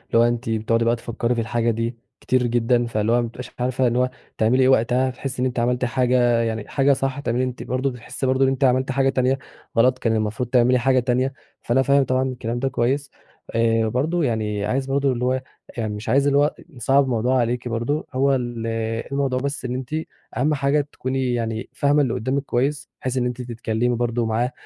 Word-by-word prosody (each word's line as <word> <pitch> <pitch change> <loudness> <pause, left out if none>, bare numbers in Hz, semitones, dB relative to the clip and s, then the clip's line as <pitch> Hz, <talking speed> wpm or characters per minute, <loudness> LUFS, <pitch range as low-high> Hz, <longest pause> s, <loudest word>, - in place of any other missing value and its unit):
هو 115 - +6
أنتِ 120 0 0
بتقعُدي 115 +1 +1
بقى 115 +1 +3
تفكّري 120 +1 -2
في 115 - 0
الحاجة 115 +1 0
دي 115 +1 -2 0.3
كتير 130 -1 +1
جدًا، 120 +1 +2
فاللي 110 -1 0
هو 120 - +4
ما 120 - -2
بتبقيش 120 +2 -9
عارفة 125 +1 +1
إن 120 - 0
هو 125 +1 +2 0.3
تعملي 120 +4 +3
إيه 130 - +5
وقتها، 130 +1 +3
هتحسّي 130 0 -5
إن - - +2
أنتِ 125 -1 -3
عملتِ 125 +1 +1
حاجة 120 -1 +2
يعني 110 -2 -2
حاجة 140 0 +3
صح، 135 0 -2
هتعملِ 125 -3 -1
أنتِ 125 -1 -3
برضه 130 +2 -1
بتحسِي 125 +2 -6
برضه 130 +1 +2
إن 135 - +4
أنتِ 135 +1 -1
عملتِ 130 0 +3
حاجة 135 +1 +2
تانية 130 0 +1 0.4
غلط 130 +2 +4
كان 115 -1 +1
المفروض 110 +3 -2
تعملي 125 0 +4
حاجة 130 +1 +3
تانية، 125 +2 0 0.3
فأنا 125 +3 +2
فاهم 140 +1 +4
طبعًا 130 0 +1
الكلام 120 -2 -3
ده 135 +2 0
كويّس، 135 +3 -1 0.4
إيه 115 -1 +2
برضه 155 +9 0
يعني 105 -5 -1
عايز 130 +5 0
برضه 135 0 +1
اللي 125 0 -1
هو 130 - +2
إي 130 - -1 0.4
يعني 110 -3 -2
مش 105 +2 -6
عايز 140 +2 +3
اللي 140 0 +3
هو 145 - +5
أ 150 - -1 0.2
نصعّب 135 0 +2
الموضوع 125 0 +1
عليكِ 120 +1 -1
برضه، 120 +6 -2
هو 135 +1 +3
ال 120 -3 -3 0.4
الموضوع 135 -2 0
بس 140 0 -3
إن 125 - -2
أنتِ 130 +3 -6 0.4
أهم 145 +5 +2
حاجة 140 +1 +2
تكوني 130 -1 -2
يعني 115 -1 -3
فاهمة 145 +1 +3
اللي 130 -5 0
قدّامِك 135 +5 -1
كويّس 140 +3 -1
بحيث 130 0 -2
إن 125 - +1
أنتِ 125 0 -3
تتكلّمي 120 0 -1
برضه 120 0 0
معاه، 115 +3 0
125 Hz, 215 wpm, -22 LUFS, 115-130 Hz, 0.4 s, هو